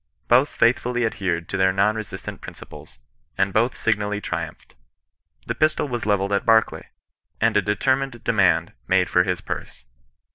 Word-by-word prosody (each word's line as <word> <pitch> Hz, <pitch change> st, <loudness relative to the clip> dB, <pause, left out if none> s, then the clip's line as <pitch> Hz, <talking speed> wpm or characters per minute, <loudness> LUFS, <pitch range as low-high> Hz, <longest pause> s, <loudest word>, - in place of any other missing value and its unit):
Both 130 Hz, +4 st, +4 dB
faithfully 120 Hz, 0 st, +1 dB
adhered 90 Hz, -6 st, -2 dB
to 100 Hz, -, -2 dB
their 95 Hz, 0 st, +3 dB
non 100 Hz, +3 st, +2 dB
resist 105 Hz, -3 st, -7 dB
ance -, -, -6 dB
principles, 75 Hz, -3 st, -12 dB, 0.4 s
and 95 Hz, 0 st, +1 dB
both 120 Hz, +4 st, +2 dB
signally 105 Hz, -2 st, -1 dB
triumphed. -, -, -6 dB, 0.7 s
The -, -, -2 dB
pistol 155 Hz, -1 st, +1 dB
was 120 Hz, -4 st, -4 dB
levelled 100 Hz, -1 st, +1 dB
at 100 Hz, -, +1 dB
Barclay, 110 Hz, -1 st, +2 dB, 0.5 s
and -, -, +2 dB
a 105 Hz, -, +4 dB
determined 130 Hz, +5 st, -1 dB
demand 100 Hz, -6 st, +2 dB
made 95 Hz, -1 st, +2 dB
for 90 Hz, -, +5 dB
his 90 Hz, -1 st, -2 dB
purse. -, -, -7 dB
105 Hz, 155 wpm, -23 LUFS, 95-120 Hz, 0.7 s, for